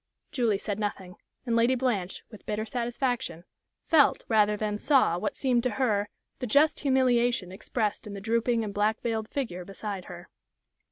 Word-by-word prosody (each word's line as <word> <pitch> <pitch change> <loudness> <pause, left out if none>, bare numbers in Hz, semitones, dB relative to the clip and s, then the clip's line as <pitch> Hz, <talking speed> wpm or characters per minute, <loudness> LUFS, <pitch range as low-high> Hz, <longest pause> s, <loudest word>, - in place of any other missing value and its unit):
Julie 230 -6 +1
said 205 0 -4
nothing, 195 -3 -4 0.3
and 235 -2 0
Lady 235 +3 +4
Blanche, 225 -8 -1
with 215 - -13
bitter 215 +1 -2
satisfaction, 240 -6 -2 0.4
felt 305 -4 +4
rather 210 -2 +3
than 210 0 -2
saw 260 - +3
what 290 - -2
seemed 250 -3 +1
to 250 - 0
her 210 -6 +1 0.3
the 250 - -3
just 290 +7 +4
humiliation 245 -7 +2
expressed 210 +2 -2
in 205 - -7
the - - -5
drooping 230 +2 +1
and 205 -2 -4
black 210 +2 +1
veiled 220 -2 -2
figure 205 -11 -3
beside 195 0 -6
her. 175 0 -10
220 Hz, 165 wpm, -28 LUFS, 205-245 Hz, 0.4 s, Lady